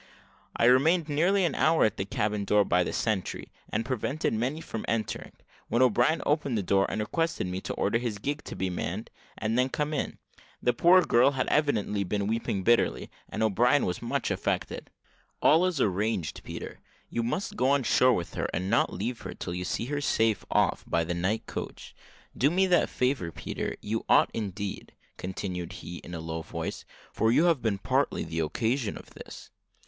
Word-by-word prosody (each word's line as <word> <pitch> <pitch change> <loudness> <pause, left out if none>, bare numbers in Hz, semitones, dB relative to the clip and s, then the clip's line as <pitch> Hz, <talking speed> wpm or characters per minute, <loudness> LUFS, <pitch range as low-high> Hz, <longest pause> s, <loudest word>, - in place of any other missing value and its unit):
I - - +2
remained 155 +7 +4
nearly 180 +6 +3
an 170 - 0
hour 160 +1 +3
at 110 - 0
the 95 - -2
cabin 105 +1 -1
door, 105 0 +3
by 90 0 +3
the - - -3
sentry, 105 -5 -2 0.2
and 115 +2 -1
prevented 130 +4 -1
many 125 +8 -1
from 115 -8 -6
entering, 115 -1 -2 0.3
when 120 +2 +3
O'Brien 125 +6 +3
opened 145 -5 +1
the 100 - -1
door, 95 +2 +2
and - - -3
requested 165 - -1
me 90 +1 -4
to - - -4
order 115 +4 +1
his 120 -4 -3
gig 145 +8 -3
to - - -6
be 95 0 -2
manned, 90 +5 -4 0.3
and 110 +2 0
then 130 - +3
to - - -14
come 150 +1 -1
in. 145 - -2 0.4
The 125 - +2
poor 180 +8 +6
girl 120 -1 +5
had 130 - 0
evidently 110 -9 +1
been 100 +2 -1
weeping 105 -3 -1
bitterly, 120 +4 +2 0.2
and 110 - -2
O'Brien 120 +6 +3
was 90 - -3
much - - -1
affected. - - -2 0.5
"All 165 +4 +5
is 175 -6 -2
arranged, 100 - 0
Peter; - - -7 0.3
you 120 - 0
must 185 - -2
go 130 - +2
on 140 -1 +3
shore 125 +2 +4
with 85 - -3
her, - - -2
and 90 +3 -2
not - - +3
leave 115 +6 -4
her - - -7
till 85 - -5
you 90 +1 -3
see 95 +5 -2
her 145 +2 -2
safe 110 -6 +1
off - - +2
by 85 - +1
the 85 +2 -2
night 90 +6 -1
coach. - - -7 0.4
Do 140 - +3
me 185 +4 +3
that 180 -2 +3
favour, 125 -9 0
Peter 80 -3 -4
you 110 +2 -2
ought - - +5
indeed," 100 -2 -5 0.2
continued 90 -1 -5
he, 90 -1 -8
in 85 - -8
a - - -5
low 80 0 -4
voice, - - -5 0.3
"for 110 - +2
you 150 - +4
have 165 -7 +3
been 110 -3 0
partly - - 0
the 80 0 -4
occasion 110 - -1
of - - -13
this." - - -11
115 Hz, 195 wpm, -28 LUFS, 95-140 Hz, 0.5 s, poor